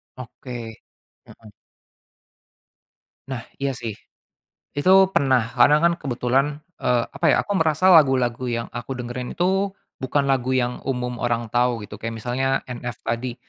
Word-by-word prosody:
Oke, 120 -2 -8 0.5
mhm. 110 -2 -16 1.8
Nah, 125 -3 -4 0.2
iya 140 -1 +1
sih. 110 -2 -5 0.8
Itu 190 +5 +5
pernah, 130 -4 +3 0.2
karena 145 +5 +7
kan 170 0 +5
kebetulan, 130 0 0 0.3
eee, 120 -1 +1
apa - - -1
ya, - - +2
aku 205 - -4
merasa 160 +3 +3
lagu-lagu 130 -6 +4
yang 115 -1 -2
aku 120 +2 -6
dengerin 125 0 -5
itu, 190 +2 0 0.2
bukan 140 +2 0
lagu 130 -1 +1
yang 125 -1 0
umum 125 -2 -2
orang 120 -2 -1
tahu 120 -2 +1
gitu, 105 0 -9
kayak 115 +1 -5
misalnya 130 +4 -1
NF 120 -2 -6
tadi. 115 +1 -3
125 Hz, 140 wpm, -23 LUFS, 120-140 Hz, 1.8 s, karena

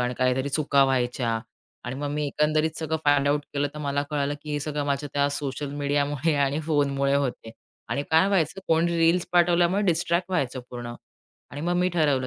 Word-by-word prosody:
आणि 125 0 -1
काहीतरी 130 +2 +1
चुका 140 -1 +3
व्हायच्या 125 -3 0 0.5
आणि 120 - -4
मग 145 +1 -3
मी 150 0 -1
एकंदरीत 155 +2 +1
सगळं 160 0 -1
फाइंड 145 -1 +3
आउट 145 +1 +2
केलं 145 0 0
तर 150 - -7
मला 145 -1 -1
कळालं, 145 -1 -1
की 150 - -7
हे 145 - 0
सगळं 145 0 -3
माझ्या 140 +1 -1
त्या 145 0 +2
सोशल 140 0 -4
मीडियामुळे 145 +1 0
आणि 140 +3 -1
फोनमुळे 140 -3 +1
होते 140 -5 -1
आहे - - -10 0.4
आणि 140 - -1
काय 160 +3 +5
व्हायचं 190 -1 0
कोणी 170 +1 +2
रील्स 165 +2 +3
पाठवल्यामुळे 175 +2 +3
डिस्ट्रॅक्ट 175 0 +1
व्हायचं 135 -7 -1
पूर्ण 120 -1 -6 0.6
आणि 145 - -7
मग 175 +3 0
मी 180 +1 +2
ठरवलं, 145 -6 +2
145 Hz, 190 wpm, -25 LUFS, 140-160 Hz, 0.6 s, काय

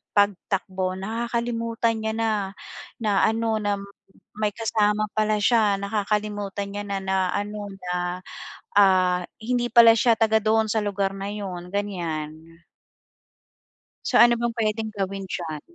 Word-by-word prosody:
pagtakbo 190 -2 0
nakakalimutan 230 +2 -2
niya 220 0 -2
na 225 0 0 0.7
na 205 -3 +2
ano 225 0 0
na 205 0 +1 0.6
may 210 -1 0
kasama 215 -2 +1
pala 215 0 +2
siya, 215 -4 +4
nakakalimutan 205 -1 -2
niya 205 +1 -4
na 200 -1 -2
na 190 0 0 0.2
ano 205 0 -4
na, 180 0 -2 0.6
ah, 185 -2 +4 0.2
hindi 240 +2 0
pala 230 -1 +8
siya 230 0 +4
taga 220 -1 +4
doon 220 0 +3
sa 220 - +2
lugar 200 -1 -1
na 195 +1 -4
'yun 185 -4 -6
ganiyan. 165 -5 -4 1.5
So, - - +2
ano 235 0 +6
bang 235 0 -1
puwedeng 220 -1 -1
gawin 195 -1 -3
diyan? 160 -5 -5
205 Hz, 130 wpm, -24 LUFS, 190-220 Hz, 1.5 s, pala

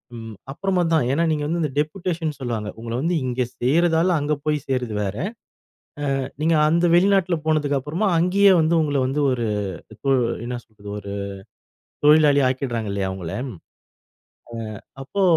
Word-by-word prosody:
ம். 115 -2 -8 0.2
அப்புறமா 185 +4 0
தான். 155 -7 +3
ஏனா, 165 +5 +2
நீங்க 150 -1 -1
வந்து 170 +2 -1
இந்த 150 -3 -1
டெப்யூடேஷன்னு 160 0 -2
சொல்வாங்க. 110 -4 -3
உங்கள 115 0 -5
வந்து 170 +3 0
இங்கே 125 0 0
சேர்யிரதால 165 +6 +3
அங்க 145 +1 0
போய் 150 -2 0
சேர்றது 125 -4 -1
வேற. 100 0 -3 1.0
ஆ - - -1 0.2
நீங்க 165 +1 +3
அந்த 170 +2 +3
வெளிநாட்ல 190 -1 +3
போனதுக்கு 150 -3 +1
அப்புறமா 165 +10 -1
அங்கேயே 195 +4 +5
வந்து 160 +2 +2
உங்கள 145 -2 0
வந்து 135 +3 -1
ஒரு 120 -2 -1 0.5
இப்போ 125 +6 -3 0.4
என்ன 125 0 -3
சொல்றது 105 -2 -13
ஒரு 100 0 -7 0.9
தொழிலாளி 150 -2 +6
ஆக்கிடுறாங்க 120 -5 -2
இல்லையா 100 -1 -1
அவங்கள 90 -3 -6 0.2
ம். 110 - -8 1.3
ஆ - - -34 0.2
அப்போ 200 +8 -2
145 Hz, 150 wpm, -22 LUFS, 120-170 Hz, 1.3 s, தொழிலாளி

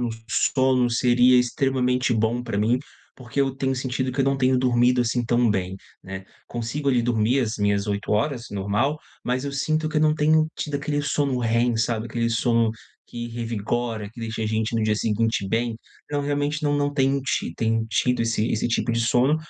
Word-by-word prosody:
no 120 - 0 0.2
sono 130 -1 +2
seria 125 +1 +4
extremamente 125 0 +1
bom 115 +2 0
pra 100 - -3
mim, 110 +4 +2 0.4
porque 130 +2 -4
eu 135 -1 +1
tenho 135 0 -1
sentido 130 0 -2
que 135 - -2
eu 135 - +3
não 135 0 +1
tenho 130 -1 +2
dormido, 125 0 +3
assim, 120 0 0
tão 120 0 +2
bem, 95 -2 -1 0.3
né. 95 0 -7 0.2
Consigo 120 +5 -3
ali 125 -3 +3
dormir 120 +1 +1
as 115 -4 -1
minhas 100 0 +1
8 100 0 -3
horas, 115 +3 0
normal, 105 +9 0 0.3
mas 125 +2 -1
eu 140 - -4
sinto 155 +3 0
que 155 - -4
eu - - +3
não 155 0 +4
tenho 155 +1 +3
tido 150 -2 -4
aquele 145 +1 -1
sono 145 -3 0
REM, 115 +1 +1
sabe, 115 0 -1
aquele 115 +1 -1
sono 115 -1 +2 0.3
que 120 0 -6
revigora, 115 -1 -3
que 115 - -17
deixa 110 -1 -4
a - - -1
gente 110 +1 -1
no 115 - +1
dia 110 0 +1
seguinte 110 -1 0
bem. 115 +1 -1 0.3
Então 145 -1 -2
realmente 145 +2 -1
não 145 0 +2
não 145 0 0
tenho 135 0 +1
ti 110 - -2
tenho 115 0 0
tido 125 +1 +1
esse 115 0 0
esse 110 - 0
tipo 120 0 0
de 115 - 0
sono, 125 +6 +3
120 Hz, 200 wpm, -24 LUFS, 115-135 Hz, 0.4 s, seria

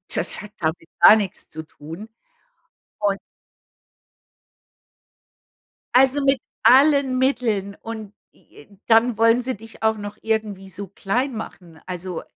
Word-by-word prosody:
das - - 0
hat 210 - -11
damit 160 0 -3
gar - - +9
nichts 205 -4 -4
zu 160 0 -7
tun. 160 +6 -11 0.9
Und 200 -1 +1 2.8
Also, 265 +2 +4
mit 270 -1 +3 0.2
allen 275 -1 +5
Mitteln 225 -7 0
und 220 -3 -8 0.2
j 145 - -20
j 200 - -20
dann 225 0 +4
wollen 230 +2 +4
sie 260 -2 -3
dich 225 +2 -14
auch 220 0 +2
noch 205 0 -7
irgendwie 215 -3 -2
so 195 +2 -7
klein 240 +8 -2
machen. 175 -6 -9
Also, 180 -1 -6
215 Hz, 125 wpm, -22 LUFS, 190-245 Hz, 2.8 s, gar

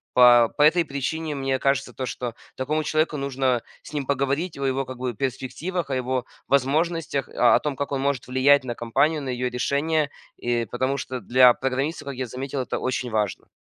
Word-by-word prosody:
По 120 -2 +7
по - - +1
этой 165 +3 +5
причине 150 +3 -3
мне 135 -1 0
кажется 135 0 +1
то, 130 - -4
что 120 -2 -5 0.2
такому 155 +4 -1
человеку 155 0 0
нужно 135 -3 0 0.2
с - - -13
ним 145 -2 -2
поговорить 140 +5 -1
о - - -3
его 135 0 0
как 130 -1 -8
бы 125 -1 -2
перспективах, 140 - -3
о 135 - -1
его 130 0 -1 0.2
возможностях, 145 0 +1
о 120 - +4
о - - +4
том 150 -2 -3
как 140 +1 -4
он 140 - -1
может 140 -3 -1
влиять 135 +2 +4
на 120 -2 -4
компанию, 140 +7 +1
на 135 - -4
ее 125 0 -1
решения, 145 +4 0 0.3
э, 120 -1 0
потому 130 +5 -1
что 130 -1 -4
для 125 +3 +6
программиста, 135 +5 -2
как 140 - -4
я 130 0 -4
заметил, 130 +3 -4
это 125 - -3
очень 130 -1 -2
важно. 105 -4 -2
135 Hz, 200 wpm, -24 LUFS, 125-145 Hz, 0.3 s, По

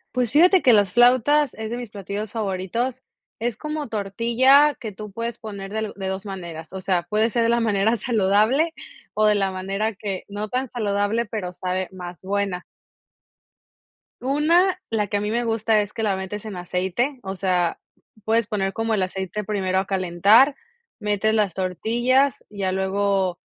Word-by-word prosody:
Pues 245 -3 +1
fíjate 360 +5 +6
que 250 - +5
las 205 -3 +3
flautas 255 +4 +4
es 220 0 -6
de 240 - -3
mis 245 -2 -6
platillos 200 +1 -5
favoritos. 225 +4 -2 0.4
Es 235 0 -1
como 300 +3 -4
tortilla 235 +7 +3
que 220 - -5
tú 210 +1 -9
puedes 230 +3 -4
poner 200 -3 -8
de 220 +1 -2
lu 215 - -5
de 195 -1 -5
2 190 +2 -4
maneras, 170 -5 -7
o 190 - -5
sea, 180 -2 0
puede 215 +4 +1
ser 235 +1 +1
de 230 - +2
la 235 0 +3
manera 220 0 +2
saludable 225 - +2 0.4
o 215 - +2
de 210 - +4
la 195 -1 +1
manera 195 +4 -2
que, 195 -1 -5
no 205 +1 -5
tan 255 +3 -1
saludable, 215 0 0
pero 190 -5 -4
sabe 185 +1 -2
más 180 -2 -9
buena. 195 -2 -1 1.6
Una, 335 +8 +2
la 210 -2 0
que 205 - -1
a - - -2
mí 210 - -2
me 235 +2 0
gusta 225 -1 +2
es 205 0 -6
que - - -4
la 205 -3 +1
metes 190 +3 -6
en 210 - -6
aceite. 185 +9 -2
O 190 0 -4
sea, 180 -3 0 0.5
puedes 225 0 +2
poner 195 -3 -1
como 225 +1 -1
el 195 - +1
aceite 190 +2 -4
primero 190 -2 -1
a 190 - +1
calentar, 195 +9 +4 0.4
metes 210 0 0
las 205 -5 +1
tortillas, 240 +9 +1
ya 195 -3 -2
luego 190 -1 0
210 Hz, 180 wpm, -23 LUFS, 190-235 Hz, 1.6 s, fíjate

